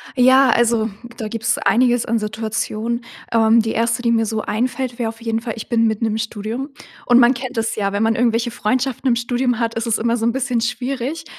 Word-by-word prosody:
Ja. 260 Hz, +1 st, +5 dB
Also, 230 Hz, -2 st, +2 dB, 0.3 s
da 220 Hz, -3 st, -4 dB
gibt's 225 Hz, +1 st, -1 dB
einiges 245 Hz, 0 st, +2 dB
an 230 Hz, +1 st, 0 dB
Situationen. 220 Hz, +2 st, -3 dB, 0.3 s
Ähm, 225 Hz, 0 st, +4 dB
die 220 Hz, 0 st, -2 dB
1., 230 Hz, +2 st, 0 dB
die 235 Hz, -1 st, +1 dB
mir 225 Hz, -1 st, +2 dB
so 220 Hz, 0 st, -2 dB
einfällt, 250 Hz, +3 st, -2 dB
wäre 230 Hz, -2 st, 0 dB
auf 225 Hz, +1 st, -11 dB
jeden 225 Hz, -1 st, -2 dB
Fall: 230 Hz, -1 st, -4 dB
Ich 220 Hz, -, -8 dB
bin 230 Hz, -2 st, +3 dB
mitten 220 Hz, +1 st, -1 dB
im 220 Hz, 0 st, -1 dB
Studium. 225 Hz, +4 st, -4 dB, 0.4 s
Und 245 Hz, 0 st, +5 dB
man 240 Hz, +1 st, +6 dB
kennt 260 Hz, 0 st, -6 dB
das 225 Hz, 0 st, -1 dB
ja, 200 Hz, -2 st, -1 dB
wenn 205 Hz, +2 st, 0 dB
man 225 Hz, 0 st, +2 dB
irgendwelche 235 Hz, 0 st, +1 dB
Freundschaften 255 Hz, +4 st, -1 dB
im 240 Hz, -, +3 dB
Studium 245 Hz, 0 st, -1 dB
hat, 230 Hz, -1 st, -1 dB
ist 230 Hz, +1 st, -2 dB
es 225 Hz, -, +1 dB
immer 235 Hz, +1 st, 0 dB
so 225 Hz, -, -2 dB
'n 235 Hz, -, +3 dB
bisschen 250 Hz, -2 st, -1 dB
schwierig. 255 Hz, +5 st, -3 dB
230 Hz, 220 wpm, -19 LUFS, 225-245 Hz, 0.4 s, man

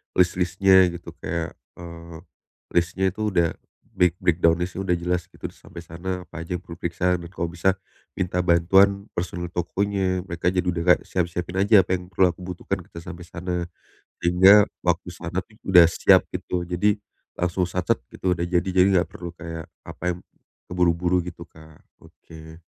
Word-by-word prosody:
list-listnya 90 Hz, +1 st, +4 dB
gitu 85 Hz, -1 st, -7 dB
kayak, 85 Hz, 0 st, -3 dB, 0.2 s
eee, 85 Hz, -1 st, -10 dB, 0.5 s
listnya 85 Hz, +2 st, +1 dB
itu 110 Hz, +2 st, -3 dB
udah 85 Hz, -5 st, +2 dB, 0.4 s
break 90 Hz, -2 st, +2 dB
breakdown 85 Hz, -1 st, +3 dB
listnya 90 Hz, +1 st, -4 dB
udah 90 Hz, -, +3 dB
jelas 85 Hz, 0 st, -2 dB
gitu -, -, -8 dB
sampai 85 Hz, -, -12 dB
sana, 90 Hz, +2 st, -5 dB
apa 85 Hz, -, -10 dB
aja 85 Hz, +2 st, -4 dB
yang 90 Hz, -, -7 dB
perlu 85 Hz, -2 st, -11 dB
periksa 90 Hz, +1 st, 0 dB
dan 85 Hz, -, -8 dB
kalau 85 Hz, -1 st, -4 dB
bisa, 90 Hz, +2 st, +1 dB, 0.4 s
minta 90 Hz, -1 st, -1 dB
bantuan 95 Hz, +3 st, +4 dB
personil 85 Hz, 0 st, -4 dB
tokonya, 95 Hz, +1 st, -1 dB
mereka 85 Hz, -1 st, -4 dB
jadi 90 Hz, -1 st, +2 dB
udah 90 Hz, -2 st, -1 dB
kayak -, -, -13 dB
siap-siapin 90 Hz, 0 st, -2 dB
aja 100 Hz, -1 st, +6 dB
apa 90 Hz, 0 st, -1 dB
yang 90 Hz, -, -12 dB
perlu 90 Hz, 0 st, +3 dB
aku 85 Hz, -, -18 dB
butuhkan 90 Hz, +2 st, -4 dB
ketika 85 Hz, -, -10 dB
sampai 90 Hz, 0 st, -9 dB
sana, 90 Hz, +1 st, -4 dB, 0.7 s
sehingga 95 Hz, +4 st, +6 dB, 0.2 s
waktu 90 Hz, 0 st, 0 dB
sana 85 Hz, +1 st, -4 dB
tuh, 105 Hz, +3 st, -18 dB
udah 90 Hz, -3 st, +7 dB
siap 85 Hz, -, +4 dB
gitu. 90 Hz, -1 st, -4 dB
Jadi 100 Hz, +4 st, +1 dB, 0.3 s
langsung 90 Hz, +1 st, -1 dB
sat-set 90 Hz, 0 st, 0 dB, 0.2 s
gitu 90 Hz, -2 st, -1 dB
udah 85 Hz, -, -2 dB
jadi, 85 Hz, 0 st, +1 dB
jadi 90 Hz, +1 st, +6 dB
enggak 90 Hz, -1 st, +2 dB
perlu 85 Hz, -1 st, -8 dB
kayak 80 Hz, -1 st, -7 dB, 0.2 s
apa -, -, -11 dB
yang 85 Hz, -, -9 dB, 0.5 s
keburu-buru 90 Hz, 0 st, +1 dB
gitu, 85 Hz, -1 st, -9 dB
Kak. 80 Hz, -1 st, -17 dB, 0.2 s
Oke. 80 Hz, +1 st, -14 dB
90 Hz, 170 wpm, -24 LUFS, 85-90 Hz, 0.7 s, udah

